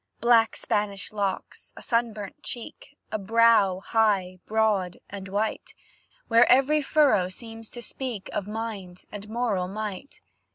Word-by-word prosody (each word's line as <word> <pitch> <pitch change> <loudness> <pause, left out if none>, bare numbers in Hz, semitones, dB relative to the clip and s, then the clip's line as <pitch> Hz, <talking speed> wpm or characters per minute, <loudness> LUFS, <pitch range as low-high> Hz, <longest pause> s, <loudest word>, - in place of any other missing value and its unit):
Black 230 -2 +4
Spanish 200 -1 -2
locks, 200 -2 -4
a - - -9
sunburnt 225 -4 -2
cheek 280 +4 -8
A 215 - -2
brow 205 -3 +4
high, 195 -5 +1
broad, 210 -5 +1
and 195 -1 -7
white, 205 +3 -3 0.5
Where 230 +1 +5
every 275 +4 +4
furrow 275 -11 +3
seems 225 +2 -7
to 240 - -8
speak 235 -4 -5
Of 200 - -2
mind 210 -5 -6
and 205 0 -8
moral 220 -6 -1
might. 210 +5 -6
215 Hz, 130 wpm, -26 LUFS, 195-230 Hz, 0.5 s, Where